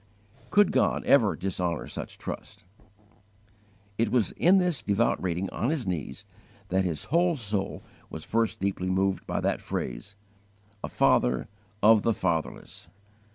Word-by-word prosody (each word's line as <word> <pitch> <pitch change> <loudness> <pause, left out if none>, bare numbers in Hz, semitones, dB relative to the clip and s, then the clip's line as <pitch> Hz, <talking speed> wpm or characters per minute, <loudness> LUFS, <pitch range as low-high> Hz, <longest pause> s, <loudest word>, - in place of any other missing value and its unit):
Could 205 0 +4
God - - +1
ever - - +4
dishonour 90 -3 -2
such - - -7
trust? - - -8 1.4
It 115 -1 +2
was 115 -4 +1
in 185 +3 +4
this 180 -5 +1
devout 105 +3 +1
reading 90 +1 -1
on 120 - -1
his 150 -6 -1
knees 90 -6 -4 0.4
that 95 +1 +2
his 85 -5 -2
whole 170 -1 +3
soul 100 -4 -3 0.3
was 80 - -7
first 115 -1 0
deeply 95 -1 -1
moved 95 +1 0
by - - -1
that - - 0
phrase, 105 - -5 0.7
"A - - -3
FATHER 60 0 +2 0.4
OF 110 0 +7
THE 115 0 +1
FATHERLESS." 85 -4 -3
100 Hz, 140 wpm, -27 LUFS, 90-115 Hz, 1.4 s, OF